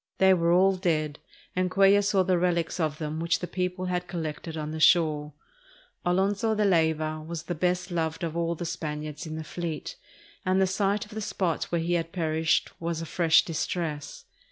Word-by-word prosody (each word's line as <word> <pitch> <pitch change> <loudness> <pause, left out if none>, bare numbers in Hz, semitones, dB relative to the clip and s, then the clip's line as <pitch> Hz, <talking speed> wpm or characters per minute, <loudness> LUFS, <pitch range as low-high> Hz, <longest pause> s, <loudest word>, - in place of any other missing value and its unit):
They 190 0 +6
were 170 -2 +2
all 190 +2 +4
dead, 155 -5 -1 0.4
and 185 0 +1
Cuellar 195 +2 +5
saw 200 -1 +3
the 180 -1 +2
relics 175 -1 0
of 155 -3 0
them 155 0 -4
which 170 +1 +1
the - - -4
people 180 +1 -3
had 180 0 -2
collected 160 -2 -5
on 155 0 -4
the 160 - -4
shore. 155 -3 +3 0.7
Alonzo 200 +5 +1
de 210 0 +2
Layva 160 -3 +1
was 165 0 -5
the 175 - -3
best 180 +2 -1
loved 165 0 -2
of 165 -1 -3
all 170 0 0
the 170 - -5
Spaniards 155 -1 -5
in 155 - -5
the 160 - -5
fleet, 170 - -5 0.5
and 185 +1 +2
the 190 - +5
sight 200 +2 0
of 210 - -18
the 220 +1 -5
spot 185 -5 -1
where 170 -1 -1
he 170 +2 -1
had 165 -1 -1
perished 160 -2 +1
was 170 -1 -2
a 165 - -4
fresh 165 -1 +4
distress. 155 -2 -3
170 Hz, 195 wpm, -27 LUFS, 160-185 Hz, 0.7 s, They